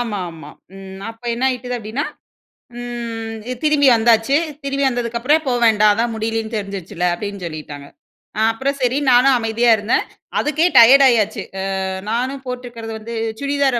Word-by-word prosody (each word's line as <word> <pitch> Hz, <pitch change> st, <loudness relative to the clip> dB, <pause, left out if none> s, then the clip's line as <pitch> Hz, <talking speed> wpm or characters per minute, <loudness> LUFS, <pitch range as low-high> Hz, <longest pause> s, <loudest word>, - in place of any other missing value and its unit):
ஆமாமா. 180 Hz, -10 st, -5 dB, 0.3 s
ம் 190 Hz, 0 st, -10 dB
அப்ப 225 Hz, +1 st, -17 dB
என்ன 245 Hz, -, -2 dB
ஆயிட்டுது 250 Hz, -1 st, -3 dB
அப்டின்னா, 225 Hz, +7 st, -4 dB, 0.8 s
ம் 230 Hz, -2 st, -5 dB, 0.3 s
திரும்பி 300 Hz, -2 st, +3 dB
வந்தாச்சு. 230 Hz, +4 st, +3 dB, 0.3 s
திரும்பி 275 Hz, 0 st, -1 dB
வந்ததுக்கப்பறம், 245 Hz, +6 st, 0 dB
போ 255 Hz, -, +1 dB
வேண்டாம், 215 Hz, -1 st, +5 dB
அதான் 230 Hz, +2 st, -1 dB
முடியலன்னு 225 Hz, 0 st, -3 dB
தெரிஞ்சுருச்சுல்ல, 195 Hz, -3 st, -4 dB
அப்டின்னு 200 Hz, 0 st, -6 dB
சொல்லிட்டாங்க. 150 Hz, -3 st, -8 dB, 0.5 s
அ -, -, +1 dB
அப்புறம் 275 Hz, +5 st, -2 dB
சரி 250 Hz, +2 st, +1 dB
நானும் 255 Hz, +2 st, +5 dB
அமைதியா 230 Hz, +1 st, +1 dB
இருந்தேன். 210 Hz, +3 st, 0 dB, 0.4 s
அதுக்கே 305 Hz, +3 st, +1 dB
டயர்ட் 270 Hz, +4 st, +8 dB
ஆயாச்சு. 220 Hz, -3 st, +1 dB, 0.2 s
அ -, -, -2 dB, 0.5 s
நானும் 260 Hz, +4 st, -2 dB
போட்டுருக்குறது 240 Hz, -3 st, -6 dB
வந்து 230 Hz, +2 st, -7 dB, 0.3 s
சுடிதார் 280 Hz, -3 st, +1 dB
235 Hz, 140 wpm, -19 LUFS, 215-255 Hz, 0.8 s, டயர்ட்